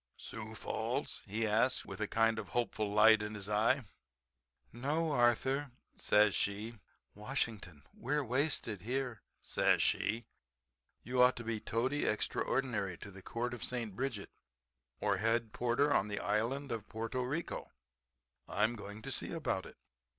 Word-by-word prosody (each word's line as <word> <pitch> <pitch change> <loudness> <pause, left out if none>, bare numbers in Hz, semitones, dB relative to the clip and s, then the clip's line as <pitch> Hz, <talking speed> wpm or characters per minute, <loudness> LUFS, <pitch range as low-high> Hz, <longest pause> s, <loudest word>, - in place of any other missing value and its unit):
"Sioux - - -8
Falls?" - - -2
he 110 +3 -1
asks 115 +4 +2
with 95 +2 -7
a 105 - +1
kind 115 0 +2
of 100 -4 -6
hopeful 110 -3 -1
light 110 +1 +7
in 105 0 -4
his 100 -2 -6
eye. 115 +6 +3 0.9
"No, 150 +7 0
Arthur," 130 +2 +2 0.3
says 105 -1 +4
she, 105 +3 -2 0.3
"Washington. 105 - -3
We're 145 +4 -1
wasted 125 - +1
here," 125 -1 -2 0.2
says - - +3
she. 115 +2 +1 0.8
"You 125 +2 +1
ought 125 +1 +6
to 120 - -6
be 115 -1 -2
Toady 130 +7 0
Extraordinary 110 -3 0
to 100 - -9
the 95 0 -11
Court 120 +5 -3
of 120 - -6
St. 115 -6 -3
Bridget 125 -5 -3 0.7
or 100 -2 +2
Head 115 +2 +1
Porter 125 +5 +2
of 100 - +2
the 100 - -3
Island 125 +7 0
of 110 -2 -4
Porto 115 +3 -2
Rico. 145 +7 -3 0.8
I'm 110 +3 +1
going 105 0 -8
to - - -5
see - - -2
about - - -2
it." - - -14
115 Hz, 150 wpm, -34 LUFS, 105-125 Hz, 0.9 s, light